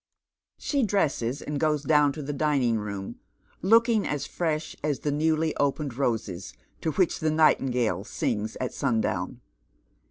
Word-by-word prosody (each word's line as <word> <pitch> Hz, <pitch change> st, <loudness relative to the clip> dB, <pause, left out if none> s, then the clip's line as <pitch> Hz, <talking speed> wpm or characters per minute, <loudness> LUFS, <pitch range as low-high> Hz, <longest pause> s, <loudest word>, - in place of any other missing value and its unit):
She 285 Hz, -2 st, 0 dB
dresses, 145 Hz, -, 0 dB
and 145 Hz, -1 st, -3 dB
goes 150 Hz, -2 st, +1 dB
down 150 Hz, -2 st, +4 dB
to 150 Hz, -, -6 dB
the 145 Hz, +1 st, -3 dB
dining 135 Hz, -6 st, +1 dB
room, 100 Hz, -2 st, -6 dB, 0.4 s
looking 225 Hz, +2 st, +4 dB
as 145 Hz, -2 st, -2 dB
fresh 160 Hz, -2 st, -2 dB
as 150 Hz, -2 st, -1 dB
the 145 Hz, -, 0 dB
new\}' 155 Hz, +1 st, +1 dB
opened 140 Hz, -2 st, 0 dB
roses, 110 Hz, -, -2 dB, 0.3 s
to 160 Hz, -, -1 dB
which 180 Hz, +3 st, +1 dB
the 155 Hz, -, +1 dB
nightingale 125 Hz, -, +2 dB
sings 105 Hz, +1 st, -2 dB
at 130 Hz, -, -3 dB
sun 115 Hz, -2 st, 0 dB
down. -, -, -2 dB
145 Hz, 150 wpm, -27 LUFS, 120-155 Hz, 0.4 s, down